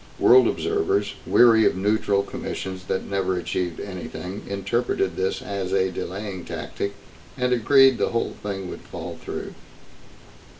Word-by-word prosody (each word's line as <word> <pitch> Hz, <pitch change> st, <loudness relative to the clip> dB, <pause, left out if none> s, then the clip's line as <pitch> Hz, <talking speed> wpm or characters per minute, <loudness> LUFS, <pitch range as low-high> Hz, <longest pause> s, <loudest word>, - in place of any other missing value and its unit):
World 395 Hz, -, +7 dB
observers, 405 Hz, -1 st, 0 dB
weary 115 Hz, -2 st, +6 dB
of -, -, +1 dB
neutral 100 Hz, 0 st, +1 dB
commissions 95 Hz, -2 st, -6 dB
that 95 Hz, -, -2 dB
never 95 Hz, -2 st, -1 dB
achieved 90 Hz, 0 st, -2 dB
anything, 95 Hz, 0 st, -6 dB
interpreted 100 Hz, -2 st, -1 dB
this 95 Hz, +1 st, -1 dB
as 95 Hz, -2 st, -3 dB
a 95 Hz, -1 st, +2 dB
delaying 95 Hz, 0 st, -5 dB
tactic 100 Hz, +4 st, -4 dB, 0.4 s
and 125 Hz, -1 st, +1 dB
agreed 135 Hz, +1 st, +5 dB
the -, -, +2 dB
whole 115 Hz, -, -1 dB
thing 95 Hz, -2 st, -4 dB
would -, -, -8 dB
fall -, -, -8 dB
through. -, -, -5 dB
100 Hz, 135 wpm, -24 LUFS, 95-115 Hz, 0.4 s, World